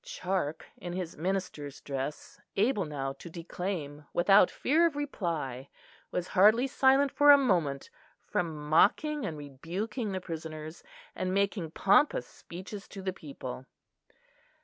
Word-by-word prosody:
Charke, 190 - -3
in 175 -1 -6
his 180 -2 -4
minister's 160 -5 -3
dress, 140 +5 -5 0.2
able 210 -2 +2
now 135 -3 -3
to 170 - -11
declaim 165 -3 -5
without 195 +2 +6
fear 330 +5 +3
of 315 - -5
reply, 165 - -3 0.4
was 180 0 -3
hardly 215 +7 +5
silent 270 +1 +4
for 290 +1 +4
a 285 - +11
moment 170 - 0 0.3
from 155 -4 -3
mocking 285 - +3
and 155 - -5
rebuking 180 - -4
the 190 - -2
prisoners, 160 -2 -7 0.3
and 185 0 -2
making 200 -4 0
pompous 210 - +3
speeches 190 +3 -9
to 195 - -9
the 190 -1 -1
people. 135 -5 -8
180 Hz, 130 wpm, -30 LUFS, 155-210 Hz, 0.4 s, a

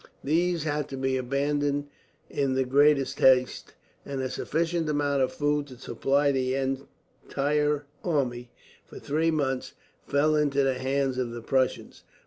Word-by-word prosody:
These 170 +2 +1
had 150 -2 -2
to 135 - -6
be 130 0 0
abandoned 145 +2 0 0.4
in 135 -2 -1
the 130 - +2
greatest 140 +1 +3
haste, 130 -1 +3 0.3
and 140 -1 -5
a 130 -1 -2
sufficient 165 +2 -1
amount 145 -2 +1
of 130 - +1
food 145 0 0
to 130 -2 -12
supply 140 +3 +1
the 130 -1 0
entire 140 +2 -2 0.2
army, 125 -7 -1 0.4
for - - -11
three 160 +3 0
months, 135 -5 -1 0.3
fell 150 +2 +2
into 145 -2 +2
the 130 -1 0
hands 135 0 0
of 125 -2 -1
the 120 0 -7
Prussians. 130 +1 -1
140 Hz, 145 wpm, -27 LUFS, 130-150 Hz, 0.4 s, greatest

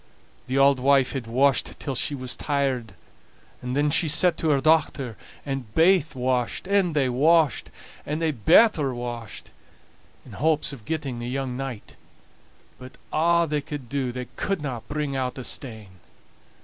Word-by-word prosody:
The 130 +2 -1
auld 135 -1 +5
wife 135 0 +3
had 130 -4 -5
washed 135 +4 +1
till 140 - -4
she 140 +3 -1
was 130 -2 -3
tired, 135 -5 -1 0.7
and 125 +1 -4
then 145 +1 +2
she 160 - +2
set 175 +4 +4
to 160 - 0
her 140 -2 +3
dochter, 145 -5 +1 0.3
and 135 -6 -4
baith 165 -3 +3
washed, 125 +2 -1
and 190 -4 +1
they 140 -3 +2
washed, 155 +5 +2 0.3
and 150 +2 -3
they 165 -1 +1
better 150 - +4
washed, 120 -2 -7 0.7
in - - -13
hopes 155 -1 0
of 115 -6 -11
getting 145 -6 -3
the 120 +1 -5
young 130 -1 -3
knight; 130 -5 -7 0.8
but 130 +1 -11 0.2
a' 170 +2 +3
they 150 -1 -1
could 140 -4 -8
do 135 -3 -2
they 125 +1 -5
couldna 145 - -3
bring 145 -2 -3
out 130 -1 -2
a 130 - -6
stain. 110 -6 -5
135 Hz, 160 wpm, -24 LUFS, 125-150 Hz, 0.8 s, auld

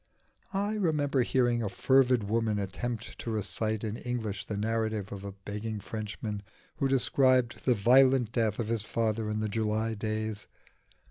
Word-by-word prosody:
I 205 +2 0
remember 150 -8 +1
hearing 120 -1 +2
a 105 - -1
fervid 130 +1 +3
woman 110 +1 0
attempt 110 +4 -4
to - - -5
recite 110 +1 0
in 110 0 -3
English 110 -6 -3
the 105 - -4
narrative 110 -1 -1
of 100 -1 -6
a 100 -1 -6
begging 105 +2 -5
Frenchman 105 0 -5 0.4
who 135 - +1
described 130 -2 +2
the 125 - +4
violent 125 +2 +5
death 110 -3 +1
of 115 - -2
his 115 -2 +2
father 110 0 -1
in 105 0 -1
the 110 - 0
July 110 +1 0
days. 110 0 -3
110 Hz, 155 wpm, -29 LUFS, 105-120 Hz, 0.4 s, violent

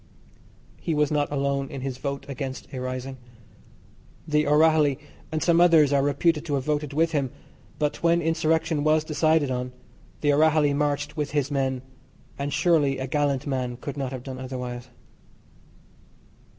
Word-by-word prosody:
He 165 - -1
was 150 0 +2
not 145 -1 0
alone 140 -1 -1
in 135 - -6
his 130 -1 -4
vote 140 0 -4
against 135 -1 -5
a 130 - -4
rising. 130 +1 -5 1.1
The 150 -1 +2
O'Rahilly 150 -2 +4 0.3
and 155 0 -1
some 170 -1 +4
others 160 -5 +5
are 140 - +4
reputed 150 +3 +1
to 145 -4 -1
have 135 - -1
voted 150 -1 -1
with 165 +3 +1
him, 140 -4 0 0.5
but 150 -1 -1
when 170 0 +3
insurrection 160 -1 +1
was 155 0 +3
decided 155 -2 +2
on, 125 0 -3 0.5
the 145 -1 +3
O'Rahilly 155 -1 +4
marched 145 +1 -1
with 150 -2 -2
his 145 -1 0
men, 130 -2 -1 0.5
and 140 +1 -3
surely 150 -3 +2
a 130 - -3
gallant 140 0 0
man 125 -3 -2
could 140 +2 -6
not 135 -3 -3
have 130 -2 -6
done 130 -1 -7
otherwise. 125 -1 -6
145 Hz, 160 wpm, -25 LUFS, 135-155 Hz, 1.1 s, others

